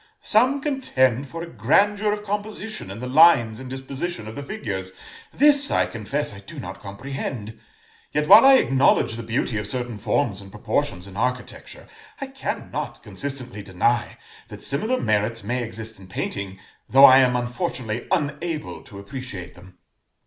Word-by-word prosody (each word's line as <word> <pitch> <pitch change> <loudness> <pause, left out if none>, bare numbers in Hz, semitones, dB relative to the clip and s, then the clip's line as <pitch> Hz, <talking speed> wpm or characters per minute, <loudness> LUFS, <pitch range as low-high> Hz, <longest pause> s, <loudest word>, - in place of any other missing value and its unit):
Some 255 +6 +3
contend 140 - +1
for 165 +4 -6
a - - -7
grandeur 200 - +2
of 210 0 -3
composition 210 - -5
in 100 +4 -7
the 125 - -4
lines 125 -6 +5
and 130 -1 -8
disposition 130 -1 -5
of 110 - -7
the 140 - -6
figures; 95 -8 -5 0.4
this, 285 0 +4
I - - +2
confess, 115 +4 -3
I 100 - -10
do 100 - -10
not 95 +1 -7
comprehend; 110 +1 -6 0.5
yet, 150 0 0
while 210 +4 +10
I 270 0 +8
acknowledge 135 - +3
the 115 - -5
beauty 115 -1 -1
of 105 - -5
certain 120 0 -4
forms 105 -1 0
and 100 - -12
proportions 90 -1 -2
in 100 0 -11
architecture, 125 - -4 0.3
I 275 - -3
cannot 270 0 -5
consistently 130 -6 -6
deny 100 +5 0 0.3
that - - -10
similar 220 - -1
merits 110 +1 0
may 125 +4 -2
exist 110 -2 -7
in 95 - -13
painting, 95 +1 -4 0.3
though 135 +1 +9
I 130 0 +9
am 125 -2 +3
unfortunately 120 -1 -3
unable 155 +1 -2
to 100 - -12
appreciate 100 -4 -8
them." 90 0 -16
125 Hz, 160 wpm, -23 LUFS, 105-165 Hz, 0.5 s, while